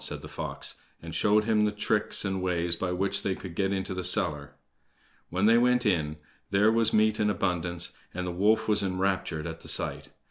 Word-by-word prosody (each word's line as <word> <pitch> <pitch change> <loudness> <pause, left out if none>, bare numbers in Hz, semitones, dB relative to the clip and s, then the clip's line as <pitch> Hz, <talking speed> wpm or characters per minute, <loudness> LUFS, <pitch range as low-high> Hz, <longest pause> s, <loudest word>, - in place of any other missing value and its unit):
said - - -3
the - - -7
fox, - - -2 0.3
and 80 0 -9
showed 105 0 +3
him 110 -1 +2
the 105 - +2
tricks 105 0 0
and 95 -1 -2
ways 85 -2 0
by 90 +1 -3
which 100 +2 0
they 95 -2 -1
could 90 -3 -9
get 95 +2 0
into 95 0 -2
the 90 0 -4
cellar. 75 -7 +1 0.7
When 95 +3 0
they 115 +2 +6
went 125 0 +2
in 80 -6 0 0.3
there 105 +3 +4
was 115 -1 +2
meat 110 0 +2
in 105 - +2
abundance, 90 -3 -1 0.2
and 90 0 -4
the 90 - -3
wolf 110 +5 +2
was 105 -1 +2
enraptured 95 -4 -1
at 80 -1 -6
the - - -11
sight. - - -2
95 Hz, 205 wpm, -28 LUFS, 90-105 Hz, 0.7 s, they